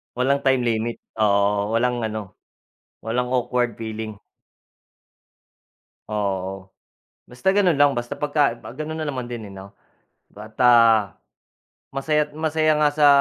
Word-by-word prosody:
Walang 135 +3 +1
time 130 -1 +3
limit, 115 0 -1 0.2
oo, 100 -1 +2
o 110 - -2
walang 125 +1 +1
ano, 110 -3 -6 0.7
walang 125 +2 -1
awkward 125 -1 0
feeling. 110 -2 -6 1.9
O, 105 - -6
oo, 95 -2 -2 0.7
basta 190 +11 -1
gano'n 180 -8 +3
lang, 145 -1 +4
basta 120 -1 -4
pagka 145 -4 +1
ah, 120 - -11
gano'n 155 +2 -5
na 155 - -3
naman 130 -4 -4
din, 115 -3 -6
eh, 100 - -11
'no, 95 +1 -10 0.6
bata 110 -1 +3 0.8
masaya't 150 +2 0
masaya 155 0 +1
nga 150 - +4
sa 150 -1 +5
120 Hz, 130 wpm, -22 LUFS, 110-145 Hz, 1.9 s, sa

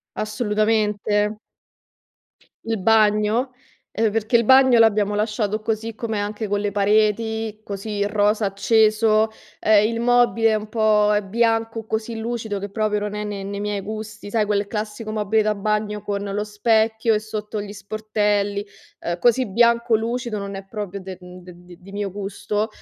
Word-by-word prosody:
Assolutamente. 210 -1 0 1.3
Il 225 -1 -2
bagno? 215 +4 +3 0.4
Uhm, 220 -1 +1
perchè 225 +2 +2
il 235 - +2
bagno 260 -1 +6
l'abbiamo 210 -2 +3
lasciato 210 0 -1
così 225 0 -3
com'è, 220 -2 -3
anche 210 +1 -3
con 205 0 -1
le 205 -1 -1
pareti, 215 +2 +1
così 205 0 -3
rosa 210 +1 +1
acceso, 215 +2 +3 0.3
ehm, 215 0 +4
il 230 0 -3
mobile 240 -1 +3
è - - +2
un 215 0 -3
po' 215 -1 +3
è 210 - +1
bianco, 225 +1 0
così 220 +1 -3
lucido 225 -2 -3
che 200 - -5
proprio 210 0 -1
non 210 0 -4
è 210 0 -3
ne 205 -1 -5
nei 200 +1 -5
miei 205 -1 -2
gusti, 215 0 -7
sai 220 -1 +2
quel 205 -1 0
classico 215 +1 -4
mobile 215 0 +1
da 215 0 +1
bagno 210 0 -1
con 200 -1 -3
lo 205 +1 -2
specchio 220 +1 +1
e - - +2
sotto 215 0 -5
gli 205 0 -7
sportelli, 205 0 -1 0.4
ehm, 170 0 -3
così 245 +5 +3
bianco 235 +2 +3
lucido, 235 0 -3
non 200 0 -5
è 195 0 -7
proprio 200 -1 -6
del 185 -1 -8
mhmm, 180 0 -12
de 180 0 -12 0.3
di 195 - -14
mio 200 -2 -3
gusto, 205 +2 -3
215 Hz, 165 wpm, -22 LUFS, 205-225 Hz, 1.3 s, bagno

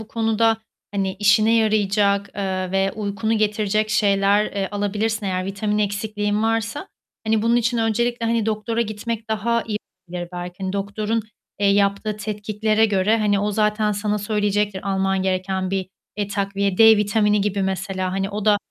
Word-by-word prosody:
bu 220 - -10
konuda 225 0 +2 0.4
hani, 195 -1 -1
işine 215 +2 +4
yarayacak, 205 -2 +2
eee, 185 -2 -2
ve 195 0 +1
uykunu 215 +1 -1
getirecek 215 0 0
şeyler, 205 -1 +3
eee, 195 -2 -3
alabilirsin 205 +1 -1
eğer 185 -1 -1
vitamin 210 +2 -2
eksikliğin 210 0 -1
varsa. 225 - -1 0.4
Hani, 220 -1 +2
bunun 230 +1 +3
için 235 0 +1
öncelikle 230 +1 0
hani, 230 -1 +1
doktora 220 +2 -1
gitmek 220 +1 -4
daha 230 +2 0
iyi 210 -2 -3 0.3
olabilir 175 0 -5
belki. 175 0 -6
Hani 190 - -2
doktorun, 210 +3 -2 0.4
eee, 200 - +3
yaptığı 200 +1 +1
tetkiklere 215 +1 0
göre 210 +2 +2
hani 205 -2 +2
o 210 - 0
zaten 210 0 +1
sana 210 +1 -1
söyleyecektir 205 -1 -1
alman 195 0 0
gereken 190 0 -1
bir, 190 -1 -2 0.3
eee, 205 -1 -2
takviye. 200 -1 -1
D 220 -1 +8
vitamini 210 0 +2
gibi 200 -1 0
mesela, 190 -1 -2
hani, 195 +1 -2
o 210 0 -4
da 210 -1 +5
210 Hz, 160 wpm, -22 LUFS, 195-220 Hz, 0.4 s, D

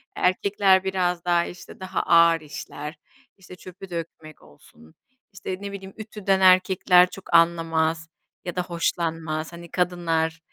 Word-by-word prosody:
Erkekler 190 +1 +2
biraz 180 -2 -1
daha, 175 -1 +2
işte, 180 - -11
daha 185 0 -3
ağır 170 -1 +5
işler; 150 0 -8 0.4
işte, 180 -1 -13
çöpü 185 +1 -12
dökmek 165 -2 -8
olsun, 80 +2 -20 0.4
işte, 190 -1 -6
ne 200 0 -6
bileyim, 195 -1 -9
ütüden 210 -3 -1
erkekler 185 -1 +5
çok 195 - -11
anlamaz 165 -1 +2 0.4
ya 180 - -5
da 180 - -1
hoşlanmaz. 165 -2 -3
Hani, 170 -1 -11
kadınlar, 165 -3 -1
175 Hz, 130 wpm, -24 LUFS, 165-185 Hz, 0.4 s, ağır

